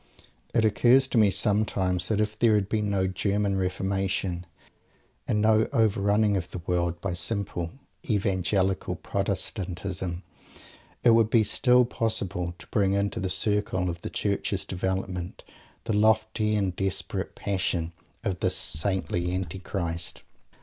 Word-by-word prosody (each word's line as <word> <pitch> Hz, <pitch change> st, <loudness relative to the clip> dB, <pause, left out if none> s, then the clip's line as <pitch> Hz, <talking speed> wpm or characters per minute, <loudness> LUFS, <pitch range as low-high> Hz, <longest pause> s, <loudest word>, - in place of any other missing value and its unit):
It 115 Hz, -2 st, +4 dB
occurs 125 Hz, +5 st, +4 dB
to 120 Hz, -, +2 dB
me 105 Hz, -2 st, +5 dB
sometimes 95 Hz, -2 st, +1 dB
that 105 Hz, -2 st, 0 dB
if 105 Hz, 0 st, -1 dB
there 115 Hz, -2 st, +4 dB
had 100 Hz, -2 st, +1 dB
been 105 Hz, -1 st, -1 dB
no 95 Hz, -2 st, +1 dB
"German 100 Hz, +1 st, 0 dB
Reformation" 95 Hz, -1 st, -2 dB, 0.8 s
and 105 Hz, -, +1 dB
no 110 Hz, 0 st, +4 dB
overrunning 105 Hz, -3 st, +2 dB
of 90 Hz, -4 st, -2 dB
the -, -, -6 dB
world 85 Hz, -1 st, 0 dB
by 100 Hz, -2 st, -2 dB
vulgar 90 Hz, -2 st, -1 dB, 0.4 s
evangelical 95 Hz, -2 st, 0 dB
Protestantism, 90 Hz, -1 st, -2 dB, 0.8 s
it 120 Hz, -, +6 dB
would 115 Hz, -1 st, +4 dB
be 115 Hz, -1 st, +4 dB
still 125 Hz, +3 st, +4 dB
possible 95 Hz, -7 st, -2 dB
to -, -, -12 dB
bring 100 Hz, -2 st, +2 dB
into 100 Hz, 0 st, 0 dB
the 95 Hz, -, -2 dB
circle 95 Hz, -2 st, 0 dB
of 85 Hz, 0 st, -8 dB
the -, -, -5 dB
Church's 100 Hz, -1 st, -1 dB
development 95 Hz, -1 st, -3 dB, 0.4 s
the -, -, -2 dB
lofty 110 Hz, 0 st, +2 dB
and 95 Hz, -4 st, 0 dB
desperate 95 Hz, 0 st, -2 dB
Passion 90 Hz, -4 st, -2 dB, 0.3 s
of 95 Hz, -3 st, -2 dB
this -, -, +1 dB
"saintly" 90 Hz, +1 st, 0 dB
Antichrist. 90 Hz, -1 st, -4 dB
100 Hz, 135 wpm, -27 LUFS, 90-105 Hz, 0.8 s, it